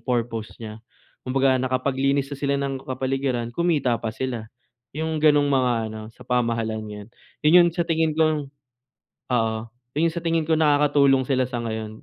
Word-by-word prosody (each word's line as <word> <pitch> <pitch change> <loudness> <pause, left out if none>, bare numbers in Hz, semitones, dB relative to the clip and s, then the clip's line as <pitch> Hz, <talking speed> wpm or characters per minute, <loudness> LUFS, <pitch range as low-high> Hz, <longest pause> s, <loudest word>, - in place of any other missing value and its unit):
purpose 115 -3 -3
niya. 110 -1 -9 0.5
Kumbaga, 130 0 +2
nakapaglinis 135 +2 0
na 140 - -4
sila 140 0 0
ng 135 -1 -3
kapaligiran, 130 -2 -2
kumita 150 -5 +1
pa - - -3
sila. 120 -4 -4 0.5
Yung 160 0 -2
gano'ng 145 -2 +4
mga 130 -3 +2 0.2
ano, 110 0 -7
sa - - -15
pamahalan 115 -3 0
ngayon. 105 0 -9 0.4
Yun 155 +4 +6
yung 170 - +4
sa 170 0 -1
tingin 160 -1 +1
kong 155 -3 +1 0.9
oo. 110 -2 +1 0.4
Iyon 165 +3 +2
sa 170 - -4
tingin 165 -1 0
ko 160 0 +1
nakakatulong 145 -3 +4
sila 130 -1 0
sa 120 -2 -4
ngayon, 110 -1 -5
135 Hz, 160 wpm, -23 LUFS, 120-150 Hz, 0.9 s, Yun